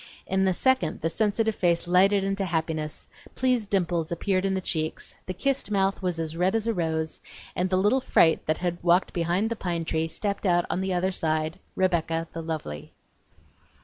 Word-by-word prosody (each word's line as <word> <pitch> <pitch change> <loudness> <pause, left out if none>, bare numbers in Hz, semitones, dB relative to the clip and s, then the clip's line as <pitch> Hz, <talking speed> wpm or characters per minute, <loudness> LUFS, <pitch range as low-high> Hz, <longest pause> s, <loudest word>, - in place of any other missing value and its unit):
In 190 0 +1
a 185 - +3
second 260 +4 +1
the 165 - 0
sensitive 220 +2 +1
face 175 -3 +1
lighted 195 +3 +4
into 195 0 -1
happiness; 160 -3 -2 0.3
pleased 250 -5 +1
dimples 175 -4 0
appeared 185 +2 0
in 195 0 +1
the - - 0
cheeks, 160 -4 -3
the - - -2
kissed 275 +4 -1
mouth 195 -1 +1
was 180 -3 -1
as 160 0 -3
red 180 +4 +1
as 225 -1 0
a 230 - +1
rose, 160 -3 -2 0.3
and 180 +1 0
the 185 - +2
little 210 +8 +3
fright 165 -9 +4
that 155 - +1
had 175 -1 -2
walked 175 +1 +3
behind 175 +6 0
the - - 0
pine 170 -5 -3
tree 160 0 0
stepped 200 +4 -2
out 175 -1 +3
on 185 - -1
the 190 0 -1
other 185 +1 +1
side 155 -2 -1 0.2
Rebecca 165 -3 0
the 165 - -4
lovely. 155 - -5
180 Hz, 190 wpm, -26 LUFS, 165-195 Hz, 0.3 s, lighted